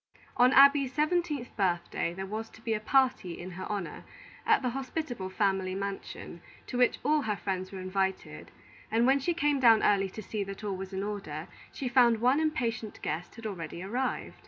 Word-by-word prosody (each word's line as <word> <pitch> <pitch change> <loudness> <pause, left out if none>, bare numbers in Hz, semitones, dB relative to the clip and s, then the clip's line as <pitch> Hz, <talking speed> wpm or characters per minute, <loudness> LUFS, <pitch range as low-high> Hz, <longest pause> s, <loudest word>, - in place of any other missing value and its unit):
On 250 +1 +5
Abby's 275 -1 +7
seventeenth 300 -2 -1
birthday, 175 -4 0
there 190 +2 -5
was 220 +3 -5
to 220 - -17
be 225 - 0
a 215 - 0
party 250 -7 +1
in 185 +2 -7
her 185 +1 -6
honor, 200 -5 -4 0.4
at - - +4
the 250 - +1
hospitable 260 -6 -4
family 190 -1 0
mansion, 195 -3 -6 0.2
to - - -7
which 250 - +4
all 300 0 +3
her 215 -5 -1
friends 185 -2 -3
were 195 - -7
invited; 190 0 -2 0.4
and, 230 +2 +3
when 270 +2 +4
she 340 +5 -1
came 295 -3 +2
down 230 -4 +6
early 195 -1 +3
to 215 +3 -8
see 210 +1 -3
that 195 +2 -8
all 200 -2 -2
was 190 +1 -6
in 190 0 -3
order, 195 -7 -5 0.2
she 270 - -4
found 240 -2 +4
one 255 +5 +3
impatient 240 -9 -2
guest 160 +3 -4
had 230 0 -10
already 175 -4 -5
arrived. 250 +7 -3
215 Hz, 190 wpm, -30 LUFS, 190-260 Hz, 0.4 s, Abby's